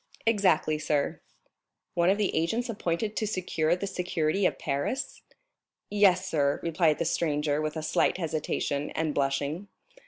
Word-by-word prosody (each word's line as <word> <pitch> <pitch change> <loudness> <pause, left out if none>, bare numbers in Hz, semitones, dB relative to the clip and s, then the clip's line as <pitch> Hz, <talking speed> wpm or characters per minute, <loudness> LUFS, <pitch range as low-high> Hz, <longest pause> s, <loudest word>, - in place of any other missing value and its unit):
"Exactly, 185 -8 +3
sir." 145 -2 -1 0.7
"One 175 +1 +3
of 195 - +3
the 210 -2 0
agents 225 +10 0
appointed 210 0 -2
to 215 - -1
secure 175 -4 0
the 185 - -4
safety 180 -1 0
of - - -3
Paris?" 140 - -2 0.7
"Yes, 190 -3 +4
sir" 145 -4 +1
replied 165 -2 +2
the 170 - -1
stranger 150 -2 0
with 155 +1 -3
a 160 - -4
slight 155 - +2
hesitation, 155 -3 -2
and 155 -2 0
blushing. 140 +7 -1
165 Hz, 145 wpm, -28 LUFS, 150-190 Hz, 0.7 s, Yes